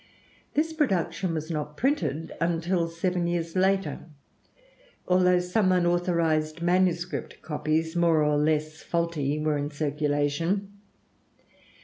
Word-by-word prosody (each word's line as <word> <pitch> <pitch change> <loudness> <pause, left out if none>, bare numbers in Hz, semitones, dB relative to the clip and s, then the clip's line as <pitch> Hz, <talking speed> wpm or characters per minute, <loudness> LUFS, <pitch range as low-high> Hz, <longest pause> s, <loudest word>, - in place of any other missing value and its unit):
This 320 +2 +1
production 190 - 0
was 155 +1 -4
not 150 -1 -4
printed 250 - -1
until 170 +1 +1
seven 175 +1 -1
years 170 -1 -2
later, 190 +1 +1 1.1
although 180 0 +4
some 185 +2 +1
unauthorized 170 -3 +1
manuscript 175 0 0
copies, 160 +1 -1
more 165 -3 +3
or 150 0 +2
less 155 +1 0
faulty, 170 -4 -1
were 150 -1 0
in 145 +1 -2
circulation. 150 +6 -1
170 Hz, 105 wpm, -27 LUFS, 155-180 Hz, 1.1 s, although